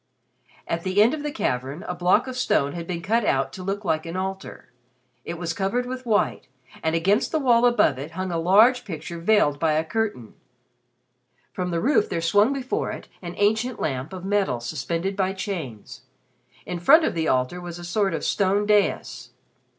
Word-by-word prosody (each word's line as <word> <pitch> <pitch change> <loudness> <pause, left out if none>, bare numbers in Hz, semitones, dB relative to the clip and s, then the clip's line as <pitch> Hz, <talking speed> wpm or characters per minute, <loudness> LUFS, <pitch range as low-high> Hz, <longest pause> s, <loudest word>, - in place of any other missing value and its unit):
At 165 - -2
the 185 +3 0
end 225 +6 +5
of 310 - -3
the 295 - -3
cavern 140 - -2
a 180 - -2
block 180 +7 +2
of 260 -1 -6
stone 145 - +1
had 170 -1 -6
been 170 -2 -4
cut 225 +5 +1
out 135 -7 0
to 185 - -8
look 195 +2 -4
like 160 -1 0
an 165 - -5
altar. 190 +1 -5 0.5
It 170 - -4
was 170 -1 -3
covered 200 +7 -1
with 255 0 -6
white, 205 - 0 0.3
and 160 0 0
against 195 +7 +2
the 320 - +1
wall 245 -4 +4
above 240 - +2
it 150 +4 -7
hung 185 -1 -2
a 165 - -1
large 215 +9 +5
picture 170 -2 -7
veiled 165 -6 +2
by 160 -1 +2
a 155 +1 +1
curtain. 205 - -3 1.2
From 180 -1 -3
the 170 -1 -1
roof 275 - +2
there - - -1
swung 205 +8 +3
before 270 -1 -2
it - - -8
an 175 -1 -7
ancient 220 +4 +1
lamp 135 +1 -3
of 185 -1 -7
metal 195 -10 0
suspended 165 +9 -3
by 190 -1 0
chains. 175 - -6 0.6
In 180 - -4
front 315 - +6
of - - 0
the 160 -1 -1
altar 130 +8 0
was 175 -1 -7
a 175 - -9
sort 195 +3 0
of - - -4
stone 200 +1 +1
dais. 210 -1 0
185 Hz, 195 wpm, -24 LUFS, 165-215 Hz, 1.2 s, front